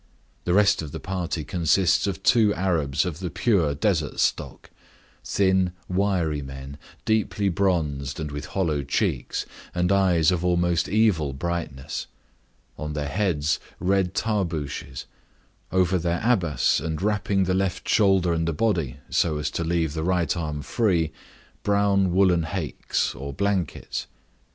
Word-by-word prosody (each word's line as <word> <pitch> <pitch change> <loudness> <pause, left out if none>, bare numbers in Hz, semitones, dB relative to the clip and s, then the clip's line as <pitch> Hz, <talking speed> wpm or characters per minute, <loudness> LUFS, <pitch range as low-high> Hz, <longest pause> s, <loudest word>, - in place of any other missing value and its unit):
The 90 - +2
rest 100 -2 +4
of 75 -3 -7
the - - -6
party 90 -4 -3
consists 90 +4 +2
of 100 - -4
two 110 -4 +5
Arabs 80 -6 0
of 85 -3 -4
the 90 -2 -3
pure 85 -6 +1
desert 80 -3 0
stock; - - -1 0.5
thin, 95 -2 +2
wiry 90 -6 0
men, 70 +1 -8 0.3
deeply 110 -2 +1
bronzed, 80 -7 0
and 75 -2 -4
with 75 0 -5
hollow 80 -7 0
cheeks, 70 - -1 0.3
and 90 +1 +1
eyes 95 -4 +4
of 90 -1 -1
almost 85 -1 +1
evil 95 -9 +2
brightness; 75 -3 -4 0.7
on 75 0 -4
their 75 -1 -2
heads 80 -5 0 0.2
red 95 0 +1
tarbooshes; 80 - -2 0.7
over 95 0 +2
their 85 +1 -1
abas, 90 -10 +2
and 80 +1 -3
wrapping 100 -2 +1
the 95 0 0
left 95 -1 -1
shoulder 95 -4 +3
and 80 0 0
the 85 - 0
body 80 - 0
so 80 -3 +2
as 75 -1 -2
to 85 - -2
leave 80 -2 0
the 80 - -3
right 85 -3 +1
arm 75 -4 -3
free, 85 -8 +1 0.5
brown 100 -2 +2
woollen 90 -3 +3
haicks, 80 -5 -2
or 70 +1 -6
blankets. 100 -1 -2
85 Hz, 140 wpm, -25 LUFS, 75-95 Hz, 0.7 s, two